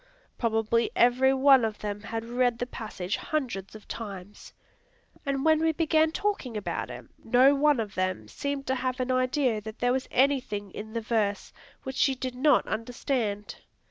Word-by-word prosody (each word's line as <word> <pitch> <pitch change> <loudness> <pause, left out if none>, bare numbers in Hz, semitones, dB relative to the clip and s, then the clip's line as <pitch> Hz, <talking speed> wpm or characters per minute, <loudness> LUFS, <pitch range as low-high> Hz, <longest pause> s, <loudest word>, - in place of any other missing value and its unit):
Probably 230 0 +1
every 250 +2 +4
one 270 -1 +6
of 220 -2 -1
them 205 -1 -5
had 225 +1 -5
read 245 0 +1
the 245 - -2
passage 215 -6 -4
hundreds 240 -11 -3
of 215 - -12
times; 205 -3 -8 0.8
and 275 +1 -1
when 315 -1 +5
we 320 0 +2
began 315 0 +2
talking 320 - -2
about 205 - -3
it, - - -8 0.2
no 255 +4 +5
one 290 -1 +3
of 210 -2 -3
them 185 -13 -2
seemed 280 - -4
to 260 - 0
have 255 -1 -2
an 255 0 -1
idea 255 -3 +1
that 215 +1 -8
there 245 0 +1
was 260 0 -2
anything 250 -7 +1
in 220 +3 -8
the 230 - -2
verse 215 -2 -1 0.3
which 265 0 -6
she 270 -1 +3
did 255 0 -4
not 265 +2 +3
understand. 230 -3 -3
245 Hz, 175 wpm, -27 LUFS, 215-270 Hz, 0.8 s, one